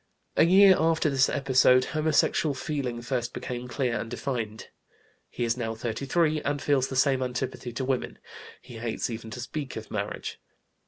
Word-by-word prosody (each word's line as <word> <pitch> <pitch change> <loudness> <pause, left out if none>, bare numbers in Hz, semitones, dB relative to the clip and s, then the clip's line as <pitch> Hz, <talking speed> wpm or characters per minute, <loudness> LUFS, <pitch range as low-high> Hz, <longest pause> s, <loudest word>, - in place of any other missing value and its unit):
A - - +5
year 190 +2 +7
after 160 -1 +2
this 135 -1 +3
episode 130 -2 +4
homosexual 155 -1 +2
feeling 130 -4 -3
first 125 -1 -2
became 125 0 -5
clear 125 -2 -1
and 115 - -5
defined. 115 -4 -4 0.6
He - - -4
is 115 -1 +1
now 115 -2 -3
33, 140 +8 0
and 145 0 -1
feels 140 -3 +1
the 135 - -6
same 130 0 +3
antipathy 125 0 -3
to 130 - -3
women; 130 -1 -2 0.5
he 120 -3 -10
hates 115 +1 -2
even 115 0 -6
to 125 - -7
speak 135 +3 -5
of 110 - -8
marriage. 100 -1 -4
130 Hz, 165 wpm, -27 LUFS, 120-145 Hz, 0.6 s, year